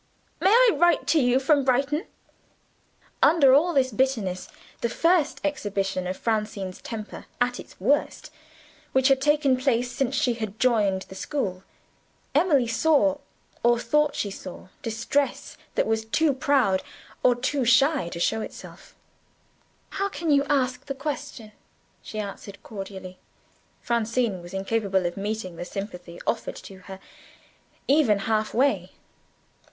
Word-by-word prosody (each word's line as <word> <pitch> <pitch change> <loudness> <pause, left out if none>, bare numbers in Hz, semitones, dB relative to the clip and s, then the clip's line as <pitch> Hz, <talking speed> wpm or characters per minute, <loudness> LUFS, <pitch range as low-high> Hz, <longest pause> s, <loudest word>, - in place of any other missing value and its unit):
May 380 - +3
I 475 +2 +6
write 345 -2 +3
to 320 - +4
you 250 -1 +3
from 280 +1 +3
Brighton?" 275 +4 +1 1.1
Under 285 -6 +6
all 320 +6 +4
this 265 -5 +2
bitterness 215 -7 -1 0.3
the 235 - -1
first 330 +3 +2
exhibition 195 -9 -2
of 185 - -3
Francine's 210 -4 -2
temper, 220 -2 -7
at 245 0 0
its - - -12
worst, 270 +10 0 0.6
which 265 +1 +4
had 270 -1 +3
taken 295 -2 +3
place 250 -2 0
since 270 +1 -1
she 250 -2 +2 0.2
joined 210 -7 +2
the - - -13
school 190 -4 -3 0.7
Emily 295 -4 +3
saw, 290 +4 +2 0.4
or 240 0 +4
thought 300 +4 +1
she 200 - -2
saw, 185 -1 -9
distress 230 +5 -2 0.2
that - - +2
was 220 0 0
too 285 +7 +1
proud, 260 -8 +2 0.4
or 245 - +4
too 260 +3 -1
shy, 240 - +3
to 170 - -7
show 220 +5 +1
itself. - - -10 1.0
"How 395 +1 -1
can 335 -4 -2
you 280 -1 +4
ask 260 -3 0
the 275 - -3
question?" 270 -6 -5 0.5
she 215 - -9
answered 200 -1 -7
cordially. 195 -3 -8 0.6
Francine 230 -4 0
was 175 0 -11
incapable 195 -1 0
of 175 - -2
meeting 200 -3 -4
the - - -4
sympathy 180 -2 -7
offered - - -2
to 190 -1 -11
her, 190 -1 -8 0.9
even 275 -7 +4
half 215 -1 0
way. 275 +4 +1
245 Hz, 135 wpm, -25 LUFS, 200-280 Hz, 1.1 s, I